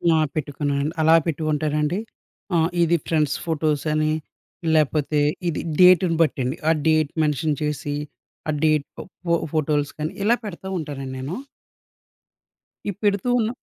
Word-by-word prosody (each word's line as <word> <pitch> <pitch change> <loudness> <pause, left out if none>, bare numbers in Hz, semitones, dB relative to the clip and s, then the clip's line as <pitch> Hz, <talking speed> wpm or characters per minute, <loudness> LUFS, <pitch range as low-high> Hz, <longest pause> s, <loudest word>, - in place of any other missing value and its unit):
ఆ! - - +4 0.2
పెట్టుకున్నానండి. 145 0 -1
అలా 160 +1 +6
పెట్టుకుంటారండి, 155 +1 0 0.6
ఆహ్, 165 0 +3
ఇది 170 +1 +3
ఫ్రెండ్స్ 150 -3 +1
ఫోటోసని 155 -1 0 0.6
లేకపోతే, 150 0 +2 0.3
ఇది 155 - -2 0.2
డేట్‌ని 180 -1 +6
బట్టండి, 135 -3 +1
ఆ - - +6 0.2
డేట్ 155 -2 +3
మెన్షన్ 150 0 0
చేసి, 150 -1 -2 0.5
ఆ - - +3
డేట్ 155 -2 +3 0.4
పో 170 -1 +3 0.2
ఫోటోస్‌కని 150 0 -1
ఇలా 235 +4 +4
పెడతా 190 -2 -7
ఉంటానండి 135 -4 -5
నేను. 135 +7 -4 1.5
ఈ - - +1
పెడుతూ 205 +2 +1
ఉన్న 220 -1 +1
155 Hz, 120 wpm, -23 LUFS, 145-165 Hz, 1.5 s, అలా